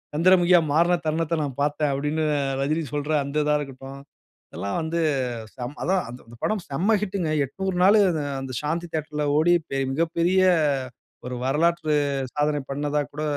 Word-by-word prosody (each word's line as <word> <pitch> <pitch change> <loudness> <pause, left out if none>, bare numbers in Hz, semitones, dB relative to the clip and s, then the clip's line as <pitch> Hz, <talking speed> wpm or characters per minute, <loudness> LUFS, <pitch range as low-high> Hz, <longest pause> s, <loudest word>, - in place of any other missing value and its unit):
"சந்திரமுகியா 175 +1 +5
மாறின 170 +3 +3
தருணத்தை 165 +1 0
நான் 140 -3 -5
பாத்தேன்" 145 0 +1
அப்டின்னு 150 +3 -1 0.4
ரஜினி 155 +4 0
சொல்ற 145 +1 -2
அந்த 145 +2 -1
இதா 150 0 +3
இருக்கட்டும். 135 -1 -8 0.5
இதெல்லாம் 100 0 -3
வந்து 165 +1 -2 0.6
செம் 125 +3 -6
அதான் 190 +1 +2
அந்த 120 -1 -12
படம் 215 -4 0
செம்ம 185 +11 +2
ஹிட்டுங்க. 190 -5 -2
800 190 +7 -4
நாளு 205 +3 +6 0.4
அந்த 135 -1 -6
சாந்தி 165 +4 -2
தியேட்டர்ல 150 -1 -2
ஓடி 175 +3 +4
பெ 135 - -2 0.2
மிகப்பெரிய 170 +4 +1 0.9
ஒரு 125 - -4
வரலாற்று 155 +2 +1 0.4
சாதனை 150 0 +1
பண்ணதா 145 +1 -1
கூட 150 +1 -4
155 Hz, 145 wpm, -24 LUFS, 145-170 Hz, 0.9 s, நாளு